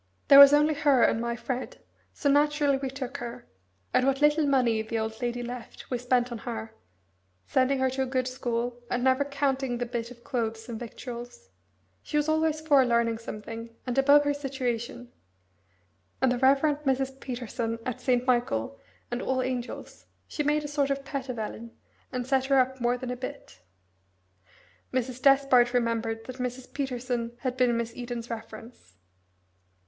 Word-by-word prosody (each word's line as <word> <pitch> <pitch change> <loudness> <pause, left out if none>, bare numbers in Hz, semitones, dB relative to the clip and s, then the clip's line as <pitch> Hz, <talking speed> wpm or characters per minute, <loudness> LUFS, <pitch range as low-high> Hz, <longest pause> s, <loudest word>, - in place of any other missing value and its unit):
There 280 - +10
was 280 0 +11
only 300 +1 +4
her 285 -4 +3
and 225 - +3
my 235 0 -2
Fred, 255 +1 -5 0.3
so 290 - -3
naturally 290 0 +3
we 270 0 -3
took 265 0 -5
her, 240 0 -7 0.5
and 255 - +3
what 270 0 +2
little 295 0 +4
money 245 -5 +2
the 220 +1 -3
old 220 +1 -3
lady 245 0 -2
left 245 +1 -8
we 250 - 0
spent 250 0 +1
on 235 - -5
her, 225 -3 -6 0.7
sending 260 - +2
her 260 0 +2
to 265 +1 -2
a - - +1
good 255 -1 0
school, 245 -1 -3
and 245 0 -1
never 260 +2 +3
counting 275 -3 -1
the 245 - -2
bit 235 -1 -4
of 240 -1 -14
clothes 225 -4 -3
and 230 -2 -5
victuals. 240 - -8 0.5
She 300 - -3
was 295 0 +1
always 315 0 +1
for 290 -4 +5
learning 235 -2 +1
something, 230 +1 -8
and 250 -2 -2
above 285 +2 +6
her 290 0 +1
station, 245 -3 -4 1.1
and 260 -1 +3
the 245 - 0
Rev. 270 +1 +5 0.2
Mrs. 270 -1 0
Peterson 240 -2 -4
at 255 - -4
St. 250 -1 +1
Michael, 115 - 0 0.3
and 240 - -2
All 260 -1 0
Angels 250 -1 -5 0.2
she - - -3
made 300 +1 +1
a - - -4
sort 285 -1 0
of 275 0 -2
pet 275 -2 -5
of 250 - -4
Ellen, 225 +1 -6 0.3
and 250 -1 -3
set 265 0 +1
her 275 0 +3
up, 260 0 +1
more 240 +1 +2
than 250 0 -5
a - - -2
bit." 255 - -8 1.3
Mrs. 255 0 -2
Despard 270 -3 +5
remembered 230 -2 -1
that 255 0 -8
Mrs. 250 0 -5
Peterson 245 -3 -3
had 255 -2 -2
been 250 -2 +2
Miss 230 0 -3
Eden's 240 -1 -5
reference. 225 - -9
250 Hz, 175 wpm, -27 LUFS, 235-275 Hz, 1.3 s, was